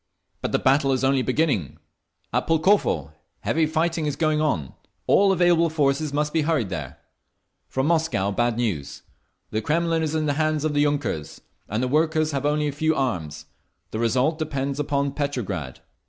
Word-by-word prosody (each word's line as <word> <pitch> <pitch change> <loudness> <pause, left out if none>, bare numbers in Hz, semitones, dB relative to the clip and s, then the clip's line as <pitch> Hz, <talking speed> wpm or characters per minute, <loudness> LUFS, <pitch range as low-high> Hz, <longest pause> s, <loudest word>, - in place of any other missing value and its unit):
"But - - -2
the - - +3
battle 135 +1 +3
is 130 - -1
only 135 0 +3
beginning. 130 - 0 0.6
At - - 0
Pulkovo 160 - +2 0.3
heavy 160 0 +1
fighting 160 0 0
is 145 - -1
going 155 0 +1
on. 85 - -1 0.3
All 200 0 +4
available 175 -2 +3
forces 150 -1 +1
must 150 +1 -1
be 160 - +2
hurried 145 - 0
there…. - - -5 0.7
"From 130 0 -1
Moscow, 160 - +1
bad 120 +2 0
news. 100 - -3 0.5
The 110 - -1
Kremlin 165 +5 +1
is 160 0 -1
in 155 -1 0
the 145 - +1
hands 155 -1 0
of 155 - 0
the 145 - +2
yunkers, 145 - -2 0.3
and 110 +4 -1
the - - +1
workers 155 +2 +1
have 140 0 -1
only 150 0 +1
a - - -1
few 155 +3 0
arms. 85 - -2 0.5
The 110 - -3
result 130 +7 +1
depends 140 -2 -2
upon 140 -1 0
Petrograd. 140 -6 -4
145 Hz, 170 wpm, -24 LUFS, 130-155 Hz, 0.7 s, All